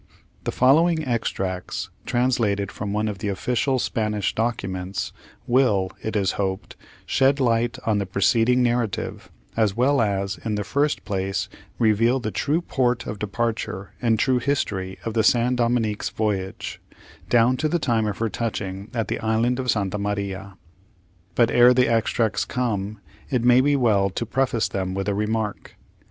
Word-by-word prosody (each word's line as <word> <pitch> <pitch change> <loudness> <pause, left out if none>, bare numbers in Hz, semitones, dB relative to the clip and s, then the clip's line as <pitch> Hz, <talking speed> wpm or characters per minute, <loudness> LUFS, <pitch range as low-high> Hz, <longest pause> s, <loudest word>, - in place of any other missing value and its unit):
The - - 0
following 160 +5 +3
extracts, 95 -7 -3 0.2
translated 115 -5 +1
from 100 -1 -5
one 105 +1 0
of 105 -2 -4
the 105 - -3
official 125 +7 0
Spanish 105 -4 -1
documents, 95 -5 -2 0.3
will, 115 -7 +2
it 110 - -4
is 100 -3 +2
hoped, 95 -1 -3 0.3
shed 135 +2 +3
light 120 0 +1
on 110 -2 +2
the 100 - -2
preceding 115 +6 +3
narrative, 120 -4 -1 0.3
as 110 -3 +1
well 135 +2 +3
as, 100 -2 -1
in 110 -2 -1
the 105 - -2
first 145 +7 0
place, 95 -2 -2 0.3
reveal 115 +3 +3
the 110 -3 -3
true 155 +9 0
port 125 -6 0
of 105 - -5
departure 105 -2 -3
and 115 -2 +2
true 125 +2 +2
history 100 -9 -2
of 115 - -2
the 110 -1 +2
San 120 +3 +3
Dominick's 115 -3 0
voyage, 100 -3 -3 0.5
down 120 +1 +4
to 155 - 0
the 175 - +1
time 115 -8 +1
of 105 - -3
her 115 - 0
touching 100 -3 -4
at 115 -2 -1
the - - -2
island 115 +3 +1
of 125 -1 -2
St. 100 -4 +1
Maria. 100 -1 -4 0.8
But, 120 -2 +3
ere 125 +1 +6
the 125 0 +4
extracts 115 -2 +1
come, 110 -4 -2 0.3
it 125 -3 0
may 125 +1 +6
be 145 +2 +3
well 105 -7 +3
to 110 +5 -3
preface 125 -2 0
them 95 -1 -3
with 95 +1 -2
a 100 - +1
remark. 105 +1 -3
110 Hz, 160 wpm, -23 LUFS, 100-125 Hz, 0.8 s, ere